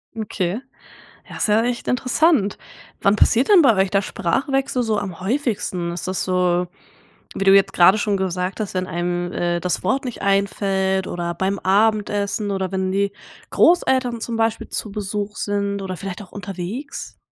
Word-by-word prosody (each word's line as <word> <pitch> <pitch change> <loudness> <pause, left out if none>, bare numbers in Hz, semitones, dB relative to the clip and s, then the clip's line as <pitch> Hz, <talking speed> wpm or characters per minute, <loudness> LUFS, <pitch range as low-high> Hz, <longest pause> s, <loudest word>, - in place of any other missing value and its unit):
Okay. 205 -2 -2 0.7
Ja, - - -9
ist - - 0
ja 215 +2 +4
echt 245 -1 -2
interessant. 255 - +2 0.4
Wann 200 +1 +3
passiert 240 +4 +3
denn 390 -6 +7
bei 235 -6 +5
euch 190 -1 +1
der 195 0 +2
Sprachwechsel 260 +8 -1
so 220 -3 0
am 190 -5 -5
häufigsten? 195 -6 -1
Ist 175 +2 -5
das 185 0 -2
so, 180 -1 +1 0.7
wie 195 - -2
du 195 0 +7
jetzt 195 0 +4
gerade 185 +4 +6
schon 205 -1 0
gesagt 185 +1 -2
hast, 205 -3 -3
wenn 185 0 -1
einem, 175 +1 -2
äh, 175 0 -1
das 180 +1 -2
Wort 265 +9 0
nicht 245 -3 -6
einfällt, 195 -1 +1
oder 170 -1 -3
beim 190 +3 -1
Abendessen, 205 +1 +1
oder 190 -2 -2
wenn 190 -1 -1
die 200 +1 0 0.4
Großeltern 260 -8 +3
zum 230 0 -3
Beispiel 225 0 0
zu 215 - -4
Besuch 205 +1 -4
sind, 200 0 -2
oder 185 -2 -5
vielleicht 195 +1 -6
auch 190 - -15
unterwegs? 200 - -6
200 Hz, 170 wpm, -21 LUFS, 185-220 Hz, 0.7 s, denn